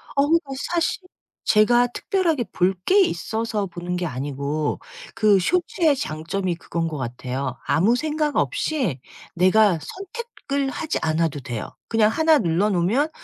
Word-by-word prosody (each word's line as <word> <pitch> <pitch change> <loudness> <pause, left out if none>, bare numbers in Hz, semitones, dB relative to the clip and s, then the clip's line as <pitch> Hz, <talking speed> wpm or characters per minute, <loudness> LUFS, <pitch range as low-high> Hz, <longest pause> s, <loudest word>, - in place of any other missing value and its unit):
어우 290 +4 +4
저 275 - -9 0.2
사실 340 +2 0 0.4
제가 240 +3 +4
특별하게 325 +1 0
볼 185 +2 +2
게 400 - +5
있어서 220 - -1
보는 175 0 -5
게 180 - -2
아니고 145 +1 -2 0.4
그 215 -3 +4
쇼츠의 335 - +2
장점이 170 +1 -2
그건 165 0 -3
것 155 -2 -4
같아요. 130 +1 -4
아무 205 +9 +3
생각 300 +1 -1
없이 270 - 0 0.4
내가 185 +1 +4
선택을 370 - -4
하지 315 +3 -3
않아도 160 -2 0
돼요. 120 -4 -6
그냥 220 -2 +4
1 320 +5 +4
눌러놓으면 195 - +1
210 Hz, 270 characters per minute, -23 LUFS, -, 0.4 s, 게